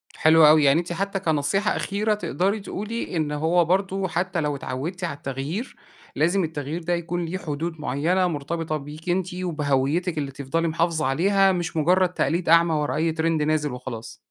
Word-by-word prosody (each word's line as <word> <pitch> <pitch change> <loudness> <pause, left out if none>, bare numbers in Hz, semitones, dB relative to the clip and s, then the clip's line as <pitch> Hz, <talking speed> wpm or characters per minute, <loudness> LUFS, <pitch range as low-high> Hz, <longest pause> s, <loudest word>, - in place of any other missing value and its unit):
حلو 160 0 +6
أوي، 155 0 +6
يعني 140 +3 +5
أنتِ 175 0 -4
حتى 195 +2 -2
كنصيحة 170 +5 0
أخيرة 210 +2 0
تقدري 205 0 -1
تقولي 210 +1 -5
إن 155 -2 -1
هو 165 +4 +2
برضو 190 +2 0
حتى 175 0 -1
لو 150 -1 -1
اتعودتِ 140 +8 -5
على 170 -5 -3
التغيير 140 - -5 0.4
لازم 175 +7 +2
التغيير 155 +1 -4
ده 175 +2 0
يكون 170 0 -2
ليه 170 +3 -3
حدود 160 -1 -4
معينة، 170 +7 +1
مرتبطة 155 0 -3
بيكِ 150 +4 -9
أنتِ 180 0 0
وبهويتِك 160 -1 0
اللي 140 -2 -2
تفضلي 140 +5 -2
محافظة 165 -1 0
عليها، 195 +8 +3
مش 175 -3 -3
مجرد 180 +4 +3
تقليد 175 -1 -1
أعمى 170 0 +5
ورا 150 -1 0
أي 160 +2 +1
ترند 160 0 0
نازل 150 -1 0
وخلاص. 120 -3 -7
165 Hz, 170 wpm, -24 LUFS, 150-180 Hz, 0.4 s, حلو